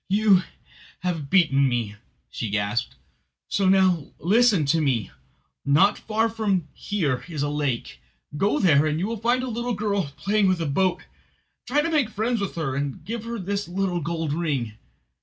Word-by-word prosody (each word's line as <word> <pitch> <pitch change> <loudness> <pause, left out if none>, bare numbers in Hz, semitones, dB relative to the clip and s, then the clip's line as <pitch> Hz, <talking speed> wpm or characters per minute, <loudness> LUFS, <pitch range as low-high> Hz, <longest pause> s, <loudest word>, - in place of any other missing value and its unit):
"You 200 -1 +4 0.6
have 165 -6 -3
beaten 140 -7 +4
me," 115 -4 -2 0.4
she 115 - -4
gasped, 105 - -1 0.5
so 195 -2 +1
now, 185 -5 +3
listen 205 - +3
to 160 +4 +2
me. 125 -9 0 0.5
"Not 155 +9 +4
far 220 +1 0
from 205 -7 -1
here 145 -12 -2
is 150 -4 -3
a 145 - 0
lake. 145 - -2 0.4
Go 195 +7 +1
there; 155 -5 +4
you 155 +4 -1
will 230 +2 -3
find 240 +4 +1
a - - -3
little 240 0 -2
girl 200 -7 -1
playing 205 0 +2
with 185 -2 +2
a 165 - -1
boat. 180 +6 0 0.6
Try 295 +3 +2
to 335 - -1
make 290 -8 +2
friends 225 +1 -1
with 200 - -3
her, 155 -6 -2
and 140 +2 -4
give 225 +3 -5
her 235 0 -4
this 200 +1 -3
little 180 -1 -1
gold 160 -1 -2
ring. 145 -9 -2
180 Hz, 170 wpm, -24 LUFS, 145-210 Hz, 0.6 s, You